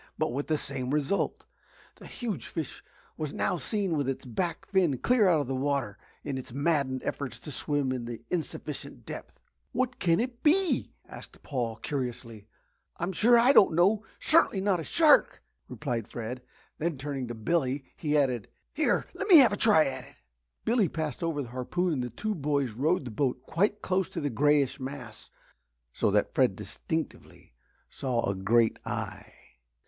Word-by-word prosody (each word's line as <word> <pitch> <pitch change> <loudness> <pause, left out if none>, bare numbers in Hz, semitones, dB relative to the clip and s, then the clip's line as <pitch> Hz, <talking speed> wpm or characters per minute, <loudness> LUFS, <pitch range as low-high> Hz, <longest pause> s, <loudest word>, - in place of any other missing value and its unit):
But - - 0
with 140 +3 -3
the 155 - +1
same 135 -3 -4
result. 150 +7 0 0.5
The - - -12
huge 230 -7 -5
fish 160 -3 -5 0.3
was 155 -3 -4
now 180 - 0
seen 195 -3 -1
with 140 -3 0
its 135 - -4
back 170 +9 -3
fin 180 -9 +2
clear 225 - +3
out 160 -4 +4
of 135 -1 -3
water 135 -6 -1 0.2
in 140 -3 -3
its 130 0 -9
maddened 140 -2 0
efforts 130 -5 -4
to 150 - -7
swim 145 -1 -1
in 125 -2 -3
the 120 -1 -6
insufficient 170 -3 -5
depth. - - -8 0.3
"What 250 0 -1
can 170 -2 +3
it 245 0 -3
be?" 360 +4 +3 0.2
asked - - -12
Paul, 120 -5 -2
curiously. 115 -4 -5 0.5
"I'm 175 +3 -2
sure 235 +6 +5
I 245 +4 +6
don't 190 - +6
know 200 +5 +3 0.2
certainly 310 -10 +3
not 190 -2 +1
a - - -4
shark," 310 - +4 0.3
replied 120 -7 -3
Fred. 120 +2 -6 0.4
Then 165 -2 -1
turning 135 -2 -4
to 120 - -5
Billy, 135 +3 0
he 150 -1 0
added, 125 -6 +1 0.3
"Here 310 - +1
let - - -4
me 365 -5 +10
have 255 -7 +7
a - - +1
try 205 -7 +5
at 130 -1 -4
it." - - -17 0.5
Billy 225 -6 +3
passed 155 -5 -4
over 165 -4 -1
the 120 - -9
harpoon 160 +8 -1
and 130 -4 -1
the 125 - -4
boys 140 - 0
rowed 145 +7 0
the 120 - -5
boat 125 +2 -1
quite 205 +8 0
close 185 0 0
to - - -5
the 145 -3 -2
greyish 145 +2 +2
mass 130 -4 -8 0.6
so - - +1
that - - +1
Fred - - +3
distinctly - - -6 0.4
saw 125 -3 -1
a 100 - +1
great 110 +4 +2
eye. - - -5
145 Hz, 175 wpm, -28 LUFS, 130-185 Hz, 0.6 s, me